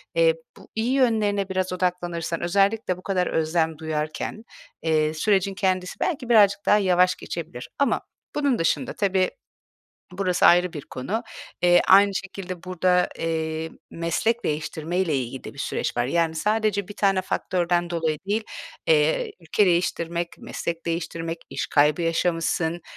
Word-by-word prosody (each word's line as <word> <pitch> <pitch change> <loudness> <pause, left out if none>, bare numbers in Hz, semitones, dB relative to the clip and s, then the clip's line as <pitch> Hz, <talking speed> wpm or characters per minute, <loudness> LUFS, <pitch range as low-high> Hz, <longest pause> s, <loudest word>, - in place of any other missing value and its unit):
eee, - - +4 0.2
bu - - -15
iyi 225 +3 0
yönlerine 215 -7 +2
biraz 185 -1 -1
odaklanırsan, 175 -2 -2
özellikle 195 +2 +1
bu 180 - -14
kadar 185 -2 0
özlem 160 0 0
duyarken, 155 +6 -4 0.4
eee, 155 -1 +1
sürecin 195 +3 +1
kendisi 185 -2 -1
belki 275 -8 -2
birazcık 205 -3 +5
daha 210 - +5
yavaş 185 -2 +3
geçebilir 140 -7 -7
ama 280 - +2 0.3
bunun 285 -4 +1
dışında, 165 - 0
tabii, 190 -2 +1 0.9
burası 185 -2 +2
ayrı 175 0 +5
bir 150 - -5
konu, 195 - -4 0.4
eee, 175 0 +6
aynı 200 +1 +7
şekilde 185 -3 -6
burada, 180 0 +2
eee, 160 0 -2 0.2
meslek 170 +8 0
değiştirmeyle 155 +2 -1
ilgili 130 0 -4
de - - -8
bir 140 - -12
süreç - - -2
var. 120 - +2
Yani 165 +4 +1
sadece 210 +1 0
1 205 - -8
tane 195 -2 +2
faktörden 175 -1 0
dolayı 165 -3 -1
değil. 215 +2 0 0.4
Eee, 155 0 +3
ülke 175 +5 +2
değiştirmek, 170 -1 0
meslek 170 0 -5
değiştirmek, 165 0 -3
iş - - -3
kaybı 150 +3 +3
yaşamışsın, 165 0 0
175 Hz, 140 wpm, -24 LUFS, 165-195 Hz, 0.9 s, aynı